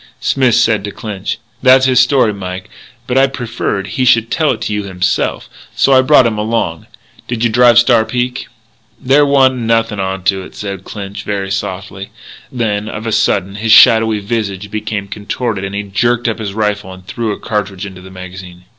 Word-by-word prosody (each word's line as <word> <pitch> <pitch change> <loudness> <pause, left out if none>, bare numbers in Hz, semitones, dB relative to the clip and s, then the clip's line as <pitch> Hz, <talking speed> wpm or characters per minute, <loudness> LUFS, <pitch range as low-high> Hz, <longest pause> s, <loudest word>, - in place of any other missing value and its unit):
Smith 130 -4 +2
said 110 -3 +2
to 105 - -4
Clinch: 100 -1 -5 0.2
"That's 130 +1 +5
his 130 -2 +3
story, 125 -3 +3
Mike. 95 -1 -7 0.3
But 130 +1 +1
I 135 - +5
preferred 115 -6 -3
he 130 - -2
should 115 -2 +3
tell 155 -2 +1
it 120 - -1
to 105 - -2
you 105 - -1
himself, 95 -3 -2 0.3
so 135 - +3
I 130 - +6
brought 130 -1 +5
him 110 -2 -1
along.... 105 -7 -2 0.4
Did 120 -1 -3
you 120 - +2
drive 120 0 +5
Star 120 -2 +5
Peak?" 125 +2 -3 0.5
"There 145 +3 +3
wa'nt 135 -2 +3
nothin' 115 -2 0
onto 95 0 -1
it," 95 - -12
said 100 -2 -6
Clinch 100 -1 -7
very 100 -1 -3
softly. 95 0 -5 0.4
Then, 110 -4 -2
of 110 +1 -6
a 115 - -2
sudden, 100 -1 0
his 110 +1 -1
shadowy 110 -3 +6
visage 105 -2 -4
became 110 -2 -4
contorted 105 +1 -4
and 95 +1 -5
he 105 - -2
jerked 120 +5 0
up 115 - -2
his 100 -2 -5
rifle 105 -3 -2
and 95 0 -12
threw 115 +3 -3
a - - -5
cartridge 100 -2 -3
into 95 -2 -10
the 95 - -12
magazine. 90 -1 -10
105 Hz, 190 wpm, -15 LUFS, 95-120 Hz, 0.5 s, I